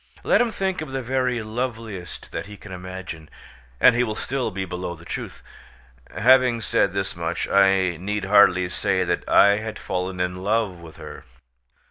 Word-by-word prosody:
Let - - +4
him 240 - +2
think 190 -5 -2
of 155 - -6
the 135 -1 -4
very 125 -2 0
loveliest 110 -5 -5
that - - -5
he 105 0 -10
can 100 - -12
imagine, 90 -3 -8 0.5
and 125 - +7
he 120 +1 +2
will 110 -3 -3
still 130 +2 -2
be 95 0 -4
below 90 -1 -5
the 85 +1 -16
truth. - - -7 0.7
Having 125 -1 +4
said 100 -1 +1
this 95 -1 -3
much, 85 0 -3
I 95 -3 +3
need 100 +3 -3
hardly 95 -2 +5
say - - 0
that - - -2
I 100 0 +6
had 110 0 -5
fallen 90 0 -4
in 90 0 -1
love 100 -1 -1
with 85 -2 -12
her. - - -10
100 Hz, 175 wpm, -23 LUFS, 90-120 Hz, 0.7 s, and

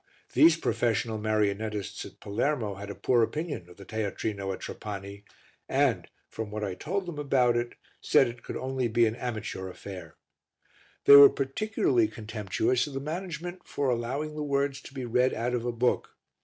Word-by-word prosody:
These 160 +4 +6
professional 115 -6 0
marionettists 105 -1 -1
at - - -17
Palermo 115 0 -1
had 100 +1 -8
a 100 - -5
poor 120 -2 +2
opinion 145 - -2
of 90 - -15
the 100 - -11
teatrino 100 -2 -3
at 95 - -6
Trapani 100 -1 -7 0.5
and, - - +2 0.2
from 110 -2 -6
what 105 0 -4
I 100 -2 -2
told 185 - -3
them 170 -4 -6
about 130 -4 +3
it, 120 0 -2 0.3
said - - +4
it 120 0 -8
could - - -6
only 130 -1 -1
be 115 +1 +3
an 110 0 0
amateur 110 -6 -4
affair. 90 -3 -9 0.9
They 140 - +10
were 140 0 +11
particularly 135 - +1
contemptuous 110 +3 -1
of 140 - -8
the - - -1
management 175 +3 -5
for 140 -3 0
allowing 130 +6 -2
the 150 - -5
words 140 -1 0
to - - -12
be 130 -2 -4
read 125 +2 +2
out 120 +2 -1
of 120 -1 -1
a 120 - 0
book. 120 +1 0
120 Hz, 175 wpm, -28 LUFS, 105-140 Hz, 0.9 s, were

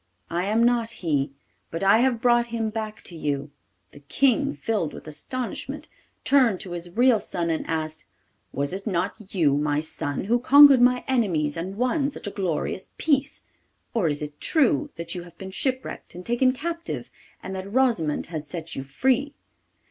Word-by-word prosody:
I 175 +2 0
am 220 +3 +2
not 235 -1 +2 0.2
he, 145 -3 +1 0.4
but 165 +3 -4
I 200 +3 +6
have 245 -2 +2
brought 240 -1 +4
him 225 -2 -2
back 215 -1 -5
to 175 - -6
you.' 145 -2 -2 0.4
The - - -14
King, 275 - +1
filled 205 -9 -1
with - - -11
astonishment, 235 - -5 0.4
turned 250 -9 +4
to 185 - -8
his 175 +2 -6
real 245 -2 +5
son 170 -4 -2
and 160 - -2
asked, 155 -1 -3 0.5
'Was 140 +4 -2
it 195 +3 -5
not 185 0 0 0.2
you, 150 -6 +3
my 145 0 +1
son, 145 -2 -3
who 235 +5 +2
conquered 280 +1 +8
my 250 0 +4
enemies 180 - +1
and 185 +4 -5
won 275 +4 +1
such 280 - -10
a 205 - -3
glorious 190 -1 -2
peace? 285 -2 0 0.5
Or 220 -8 +2
is 150 -1 -1
it 150 0 -8
true 300 0 +2
that 170 0 -5
you 180 - -5
have 175 -1 -14
been 190 0 -8
shipwrecked 260 +1 -3
and 180 +1 -9
taken 240 +2 +3
captive, 335 +5 -5 0.3
and 190 - -5
that 190 +1 -6
Rosimond 225 - +1
has 155 -3 -6
set 165 -1 -6
you - - -3
free? 265 - 0
195 Hz, 180 wpm, -25 LUFS, 160-250 Hz, 0.5 s, conquered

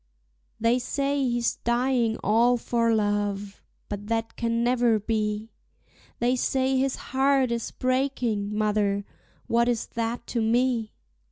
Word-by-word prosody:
They 230 +3 +3
say 280 +3 -1
he's 240 0 0
dying 240 -1 +1
all 235 +3 +4
for 230 0 +1
love, 205 -2 -1 0.3
but 205 0 -6
that 225 0 -2
can 230 0 0
never 240 -2 +3
be; 215 0 -2 0.7
They 245 +2 +2
say 265 +1 +1
his 265 0 +1
heart 265 -1 +1
is 235 -1 -2
breaking, 255 -5 -1
mother, 205 -2 +1 0.4
what 235 +1 +2
is 235 -2 0
that 230 +1 -2
to 235 - -2
me? 230 0 +1
235 Hz, 125 wpm, -26 LUFS, 215-250 Hz, 0.7 s, all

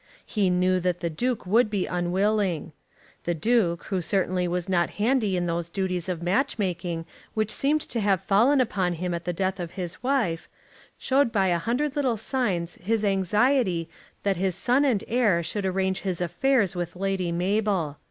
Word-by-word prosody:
He 205 -4 +1
knew 185 +1 +2
that 180 -1 -1
the 170 -1 -1
Duke 240 +8 -2
would 220 +4 +3
be 200 -3 -1
unwilling. 180 -1 0 0.5
The 175 - 0
Duke, 175 -1 +1
who 190 -3 0
certainly 180 0 0
was 175 +1 -2
not 175 -2 +2
handy 215 -3 +2
in 175 - 0
those 170 0 -2
duties 185 -1 -2
of 170 -2 -3
match 205 +12 +1
making 175 -4 -2 0.3
which 215 -1 0
seemed 300 +3 +1
to 235 - -4
have 200 -4 +1
fallen 240 +8 +4
upon 195 -8 +1
him 175 +1 -3
at 170 0 -4
the 175 - 0
death 190 +2 -2
of 170 -2 -5
his 180 -2 -5
wife, 245 -11 0 0.5
showed 270 -2 +2
by 195 -4 +2
a 175 -1 +2
hundred 255 - -1
little 260 -6 +1
signs 200 -8 -1
his 215 +3 0
anxiety 195 - +2 0.4
that 195 -2 +1
his 185 -1 0
son 260 +3 +2
and 235 -8 +1
heir 215 -8 +2
should 200 +3 -2
arrange 190 0 0
his 185 -3 -2
affairs 195 - +1
with 175 0 -4
Lady 190 -2 -1
Mabel. 185 -4 0
190 Hz, 180 wpm, -26 LUFS, 175-220 Hz, 0.5 s, fallen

